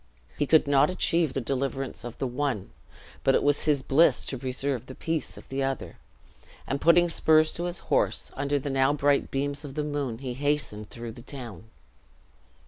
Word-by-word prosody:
He 145 - 0
could 160 +1 +5
not 140 +1 +4
achieve 170 -5 +1
the 135 - -1
deliverance 135 +1 -3
of 120 -1 -7
the - - -2
one, 125 -5 -2 0.5
but 135 - +4
it - - +2
was 145 0 +2
his 145 -3 +2
bliss 155 +6 +4
to 135 - -4
preserve 130 -1 -2
the 130 - -9
peace 160 -2 -3
of - - -12
the 135 +1 -2
other; 135 0 -3 0.7
and 140 - -3
putting 175 +1 +6
spurs 155 -2 +4
to 175 - -4
his 175 0 -3 0.2
horse, - - +1
under 140 +1 0
the 140 0 -3
now 135 +1 +3
bright 145 -1 +2
beams 140 +2 -2
of 140 -2 -8
the 150 - -1
moon 145 -6 -2
he 130 0 -5
hastened 135 -6 -2
through 115 -1 -7
the 120 - -11
town. 120 - -9
140 Hz, 190 wpm, -27 LUFS, 130-145 Hz, 0.7 s, putting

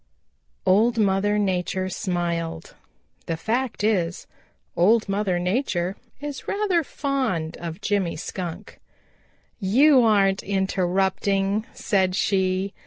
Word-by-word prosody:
Old 220 +5 +3
Mother 205 0 +2
Nature 185 -1 -1
smiled. 170 -4 -3 0.5
The 165 - -2
fact 230 +5 -2
is, 185 -5 0 0.5
Old 215 +6 +4
Mother 195 -2 0
Nature 180 -1 -1 0.2
is 290 -1 -6
rather 395 -5 +1
fond 255 - -2
of 170 +2 -7
Jimmy 200 -4 0
Skunk. 180 +4 -6 0.8
"You 255 +8 +5
aren't 195 -3 +3
interrupting," 195 +2 0
said 190 -2 +1
she. 190 0 0
195 Hz, 100 wpm, -24 LUFS, 180-215 Hz, 0.8 s, You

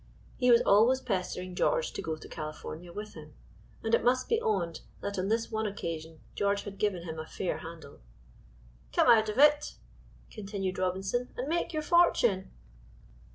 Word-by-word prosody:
He 250 -1 +2
was 235 -1 +6
always 225 +6 +5
pestering 185 -5 -3
George 485 - +1
to - - -4
go 160 - -3
to 155 - -12
California 155 +3 -7
with 210 +3 -7
him, 155 -1 -12 0.5
and 225 - -2
it - - +4
must 255 +2 +2
be 460 0 +1
owned 175 -6 -1 0.2
that 200 -1 -3
on 185 - -1
this 225 +2 0
one 220 0 -1
occasion 165 -5 -6
George 200 0 0
had 200 -1 -9
given 190 -5 0
him 160 -2 -6
a 160 - -6
fair 185 - -3
handle. 160 -3 -10 0.9
"Come - - +4
out 220 -3 +6
of 210 - -4
it," 295 +1 +4 0.6
continued 195 -3 -4
Robinson, 190 +6 -1
"and 255 - -3
make 335 +3 -1
your 310 -2 -2
fortune." 240 - +3
200 Hz, 170 wpm, -30 LUFS, 180-240 Hz, 0.9 s, was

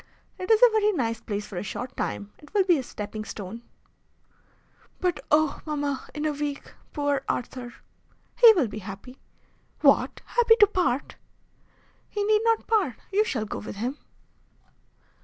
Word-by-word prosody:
"It 370 - -5
is 440 -1 +6
a - - +8
very 425 -1 +3
nice 230 - -2
place 205 -1 -4
for 200 - -8
a - - -2
short 245 +5 -6
time. 205 0 -4
It 295 +7 -18
will 400 - +5
be 350 -5 +3
a - - -1
stepping 215 -3 -6
stone." 215 +2 -7 1.4
"But 355 -5 0
oh! 305 0 +2
mamma, 290 -3 -3
in 300 0 -3
a 305 - +2
week! 290 -1 -5 0.2
Poor 285 -2 0
Arthur!" 245 0 -4 0.6
"He 470 -2 +9
will 330 - +1
be 215 0 -7
happy." 200 +6 -10 0.6
"What! - - +3
happy 465 -2 +4
to 420 - +9
part?" 360 -10 -1 0.9
"He 415 - -2
need 425 +1 +3
not 455 -1 +2
part. 400 - +1 0.2
You 415 +2 +4
shall 240 - -2
go - - -5
with 210 - -7
him." 245 +8 -3
285 Hz, 160 wpm, -26 LUFS, -, 1.4 s, He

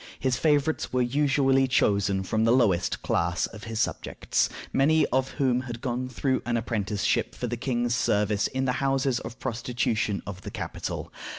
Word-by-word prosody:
His 130 -2 +1
favorites 150 +2 +1
were 125 -1 +2
usually 135 0 +2
chosen 100 -6 +2
from 110 +3 0
the 115 - +4
lowest 110 -9 +2
class 85 +1 +1
of 105 - -10
his 115 -1 -4
subjects, - - 0 0.2
many 155 +3 +4
of 130 0 +2
whom 125 -2 +1
had 120 -1 -5
gone 125 0 -3
through 130 +1 0
an 120 +1 0
apprenticeship 105 -2 -1
for - - -4
the 120 0 -2
king's 120 -1 -1
service 105 -3 +1
in 130 0 -2
the 125 - +2
houses 135 -2 +1
of 115 +2 -8
prostitution 115 -4 -1
of 95 -2 -7
the - - -7
capital. - - -5
120 Hz, 170 wpm, -26 LUFS, 110-130 Hz, 0.2 s, the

